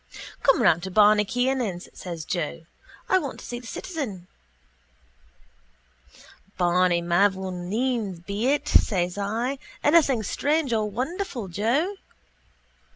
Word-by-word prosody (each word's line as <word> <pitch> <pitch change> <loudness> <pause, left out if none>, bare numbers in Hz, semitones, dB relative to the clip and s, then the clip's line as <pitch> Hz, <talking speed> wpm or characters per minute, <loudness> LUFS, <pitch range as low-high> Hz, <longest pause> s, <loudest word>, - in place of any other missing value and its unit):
—Come 270 - +4
around 170 -4 +4
to 190 - -5
Barney 210 +2 +5
Kiernan's, 245 -5 -1
says 170 -4 -7
Joe. 165 -1 -3 0.4
I 375 - +4
want 280 -6 -6
to - - -10
see 240 - -5
the 245 - -12
citizen. 240 - -5 2.3
—Barney 175 -1 +2
mavourneen's 190 +4 0
be 200 +6 -2
it, 285 +1 +1
says 180 -1 +2
I. 230 +7 -2 0.2
Anything 290 -7 +4
strange 290 +4 0
or 215 -1 0
wonderful, 255 - -4
Joe? 260 - 0
215 Hz, 110 wpm, -25 LUFS, 180-265 Hz, 2.3 s, Barney